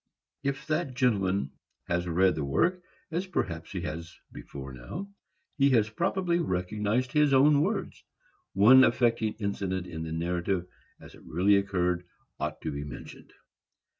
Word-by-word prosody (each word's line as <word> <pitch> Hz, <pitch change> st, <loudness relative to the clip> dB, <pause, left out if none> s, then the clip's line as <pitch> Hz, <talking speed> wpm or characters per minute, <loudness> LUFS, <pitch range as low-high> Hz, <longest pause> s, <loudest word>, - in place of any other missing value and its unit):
If 140 Hz, -1 st, -3 dB
that 155 Hz, -4 st, -1 dB
gentleman 100 Hz, -, +1 dB, 0.3 s
has 85 Hz, +1 st, -1 dB
read 90 Hz, +2 st, +3 dB
the 75 Hz, -, -3 dB
work,—as 180 Hz, -, -2 dB
perhaps 85 Hz, -, -3 dB
he 90 Hz, -, -4 dB
has 85 Hz, +1 st, -6 dB
before 70 Hz, -1 st, -9 dB
now,—he 140 Hz, -, -4 dB
has 110 Hz, -5 st, +3 dB
probably 175 Hz, -, 0 dB
recognized 105 Hz, -, -1 dB
his 150 Hz, -2 st, +4 dB
own 145 Hz, +2 st, +5 dB
words. -, -, -2 dB, 0.5 s
One 120 Hz, +7 st, +8 dB
affecting 115 Hz, -2 st, +2 dB
incident 100 Hz, -3 st, -2 dB
in 80 Hz, -3 st, -7 dB
the 80 Hz, 0 st, -5 dB
narrative, 85 Hz, +2 st, -1 dB, 0.3 s
as -, -, -14 dB
it -, -, -15 dB
really 95 Hz, +5 st, +3 dB
occurred, 90 Hz, -3 st, 0 dB, 0.4 s
ought -, -, -3 dB
to 80 Hz, -, -3 dB
be 70 Hz, 0 st, -4 dB
mentioned. 75 Hz, -, -10 dB
100 Hz, 135 wpm, -28 LUFS, 85-135 Hz, 0.5 s, One